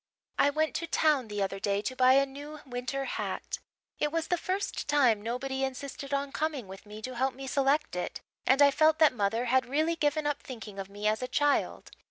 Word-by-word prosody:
"I 280 - +5
went 310 +2 0
to 335 - -4
town 300 -6 +2
the 205 -1 -2
other 195 0 -3
day 200 +1 0
to 255 - -3
buy 255 0 +6
a 275 +1 +5
new 290 +3 -9
winter 255 +2 -3
hat. - - -4 0.4
It 295 - +1
was 325 0 -2
the 355 - +3
first 375 +3 -3
time 255 -8 +4
nobody 265 +4 -3
insisted 275 +1 -5
on 280 0 -1
coming 295 -7 -2
with 195 +2 -11
me 210 +1 -10
to 255 - -4
help 260 +1 0
me 270 +1 -7
select 280 +2 +1
it, 180 - -3 0.3
and 270 +2 +6
I 280 - +7
felt 310 +2 +4
that 315 -4 +5
mother 225 +2 0
had 255 0 +2
really 310 +5 +1
given 300 -1 0
up 295 -1 -1
thinking 220 -6 -8
of 195 0 -5
me 205 +1 -3
as 215 +2 +1
a 255 - -2
child. 290 +2 0
270 Hz, 220 wpm, -29 LUFS, 235-295 Hz, 0.4 s, I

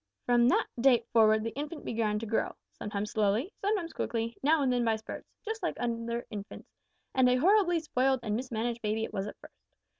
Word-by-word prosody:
"From 240 -1 +4
that 255 - +3
date 240 -2 +4
forward 220 -1 +5
the 230 - -2
infant 295 +3 -5
began 220 -2 0
to 225 - -4
grow 220 +1 -1 0.2
sometimes 210 0 -4
slowly, 215 - +1
sometimes 395 -5 -1
quickly, 230 0 -2
now 300 +1 +3
and 255 -2 +2
then 245 -1 +1
by 225 -1 +2
spurts 220 0 -8 0.2
just 445 +1 -4
like - - -1
other 235 0 -2
infants, 205 -2 -8 0.4
and 260 -1 +4
a 250 - +4
horribly 350 +4 +4
spoiled 265 -4 +1
and 210 -2 -1
mismanaged 235 -1 -2
baby 215 +1 -1
it - - -5
was 195 0 -2
at - - -8
first. - - -17
235 Hz, 200 wpm, -30 LUFS, 220-270 Hz, 0.4 s, forward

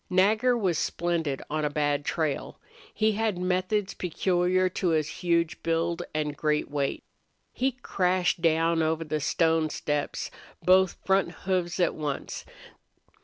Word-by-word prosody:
Nagger 215 +7 +3
was 185 -8 +1
splendid 165 -5 -1
on 155 0 -2
a 150 - +1
bad 145 -1 0
trail. 155 -4 -2 0.3
He 220 0 +2
had 215 -2 0
methods 185 +3 0
peculiar 180 +1 +1
to 185 +1 -2
his 155 -3 +2
huge 170 -1 +1
build 165 +1 0
and 150 -1 -2
great 150 -1 0
weight. 140 -2 -1 0.5
He 265 +1 0
crashed 180 -7 0
down 165 0 +3
over 160 +1 0
the 155 -1 -2
stone 160 +1 +2
steps, 145 -1 -2 0.3
both 185 0 +5
front 190 -2 +2
hoofs 180 -2 0
at 180 - +3
once. 150 -3 -4
170 Hz, 135 wpm, -27 LUFS, 155-185 Hz, 0.5 s, both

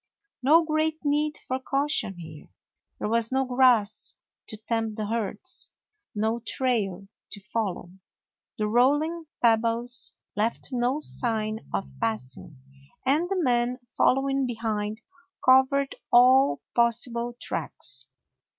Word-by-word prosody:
No 320 +6 +5
great 310 0 0
need 300 +1 +1
for 260 0 -1
cau 275 +2 0
tion 210 -10 +1
here. 160 -3 -11 0.5
There - - -3
was 230 +1 +1
no 265 0 +1
grass 250 -4 +3 0.3
to 215 - -8
tempt 225 0 -2
the 215 - -2
herds, 215 -2 -3 0.4
no 220 +3 0
trail 215 -6 -1 0.3
to 205 - -7
follow. 200 -4 -3 0.7
The 215 - 0
rolling 295 +8 +2 0.2
pebbles 230 +2 +1 0.2
left 215 +3 -1
no 250 +4 0
sign 220 -5 -1
of 95 -8 -3
passing, 125 - -4 0.5
and 305 +7 +2
the 390 - 0
man, 245 -4 +1 0.2
following 270 0 +2
behind, 220 -2 -3 0.4
covered 265 +2 +4 0.2
all 255 +3 +5
possible 235 0 +1
tracks. 135 -1 -3
235 Hz, 115 wpm, -26 LUFS, 215-265 Hz, 0.7 s, No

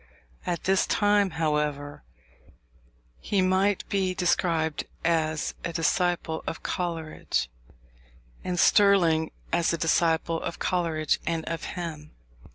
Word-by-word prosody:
At 175 -1 -2
this 190 0 +2
time, 205 -1 +3
however, 150 - -1 1.2
he 200 - -1
might 190 +2 +1
be 190 -2 0
described 165 -3 0 0.2
as 160 -2 0
a 170 - -2
disciple 170 0 0
of - - -5
Coleridge, 165 - -2 0.9
and 180 -1 -2
Sterling 170 -7 +4 0.2
as 170 -1 +2
a - - 0
disciple 165 0 +1
of - - -4
Coleridge 165 -4 0
and 165 -1 -1
of 165 -1 -4
him. 155 -3 -6
165 Hz, 110 wpm, -26 LUFS, 160-180 Hz, 1.2 s, Sterling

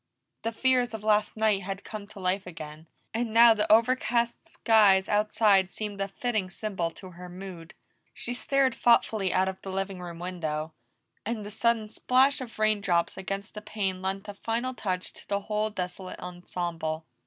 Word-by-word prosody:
The 230 - -1
fears 250 0 +2
of 215 - -8
last 210 0 +2
night 215 -2 +2
had 195 +1 -5
come 210 -2 -7
to 210 -1 -12
life 185 +1 -1
again, 155 -2 -9 0.3
and 230 0 -1
now 230 +1 +8
the 210 -1 0
over 230 +4 +6
cast 235 -2 -1
skies 205 -4 +4
outside 210 -2 +3
seemed 205 -1 -5
a 195 - 0
fitting 215 -2 -2
symbol 190 -4 -3
to 185 +3 -11
her 180 +1 -10
mood. 180 -1 -9 0.4
She 245 - -4
stared 270 +1 +2
thoughtfully 220 -5 +3
out 185 +1 +2
of 190 0 -4
the 195 - -7
living 195 -1 -3
room 170 -1 -7
windows, 160 -3 -3 0.5
and 220 -1 -3
the 205 - -6
sudden 225 0 +1
splash 260 +5 +3
of 240 -3 -8
raindrops 205 -5 +2
against 195 +2 -5
the 210 - -7
pane 195 -3 -3
lent 195 +2 -3
a 205 - -5
final 230 +5 -2
touch 185 -6 -3
to - - -13
the 200 0 0
whole 215 +1 -1
desolate 185 -2 -5
ensemble. 170 -3 -4
200 Hz, 175 wpm, -28 LUFS, 185-220 Hz, 0.5 s, now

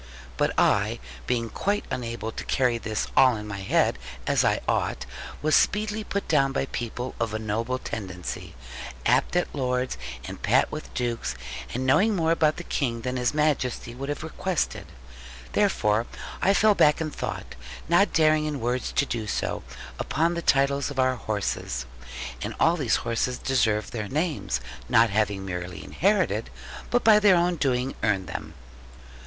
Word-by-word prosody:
But - - 0
I, - - +3 0.3
being 115 -2 0
quite 205 +1 -1
unable 115 -2 -3
to - - -6
carry 125 -3 +2
all - - -19
this 110 0 -1
in 115 -5 +4
my 100 -1 -5
head, 95 -9 +2 0.3
as - - +3
I - - +2
ought, - - 0 0.4
was 155 0 +2
speedily 215 +1 +2
put 200 -1 -3
down 135 -3 +3
by 135 - 0
people 120 0 -4
of 115 -2 -1
a - - +1
noble 110 +4 -1
tendency, 95 - -6 0.5
apt - - +3
at 180 - +1
Lords, 125 - -1 0.3
and - - -7
pat - - +3
with - - -6
Dukes, 115 - -2 0.4
and 130 +1 -2
knowing 200 +11 +4
more 165 -2 +2
about 155 -2 +3
the 175 - -5
King 120 -8 -1
than 125 +1 -3
His 125 +2 0
Majesty 140 -6 0
would 135 +3 -6
have 145 - -3
requested. 170 +2 -2 0.7
Therefore, 105 +2 +2 0.3
I 195 +1 +4
fell 215 +1 +5
back 150 -6 +4
in 155 -2 -2
thought, - - -5 0.3
not 175 +5 +4
daring 155 -1 +4
in 150 -2 -2
words 125 +2 -1
to 140 - +2
do 115 -5 -3
so, - - -2 0.4
upon 165 +3 +1
the 170 - -2
titles 140 -2 +2
of 145 - -8
our 130 0 +3
horses. 100 - -2 0.6
And - - -4
all 165 +2 +4
these 140 -9 +1
horses 120 +2 0
deserved 110 -5 +1
their 110 -3 -3
names, 150 - -1 0.3
not 115 -2 +5
having 100 -2 0
merely 90 -1 -5
inherited, 185 - +1 0.4
but 245 - +2
by 215 -1 +7
their 205 -3 +6
own 175 +1 +2
doing 130 -2 0
earned 100 -4 +1
them. 80 -3 -6
130 Hz, 165 wpm, -26 LUFS, 110-155 Hz, 0.7 s, by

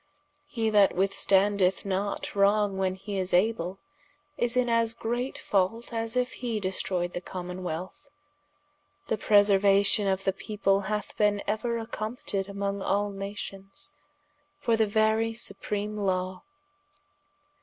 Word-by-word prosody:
He 225 -6 -1
that 205 -2 +5
withstandeth 195 0 +2
not 200 +1 -2
wrong 200 0 +3
when 185 -1 0
hee 195 +1 -4
is 185 -1 +1
able, 185 -2 +1 0.6
is 240 -1 0
in 250 -1 +3
as 230 -1 +2
great 240 +3 -2
fault, 210 +5 0
as 225 0 -2
if 250 0 +1
he 235 -3 -3
destroyed 185 -2 -1
the 175 - -4
Commonwealth. 180 - -6 1.0
The 220 - +1
preseruation 200 0 +4
of 190 0 -1
the 195 - +1
people 195 -1 0
hath 210 -1 -3
bene 205 -1 +2
euer 230 +3 -1
accompted 215 -3 -4
among 200 0 -3
all 205 +1 0
nations, 195 +3 -6 0.7
for 240 -6 +1
the 220 -1 +2
very 220 +2 +2
supreame 210 -2 -3
Law. 185 -1 -1
205 Hz, 125 wpm, -28 LUFS, 195-225 Hz, 1.0 s, that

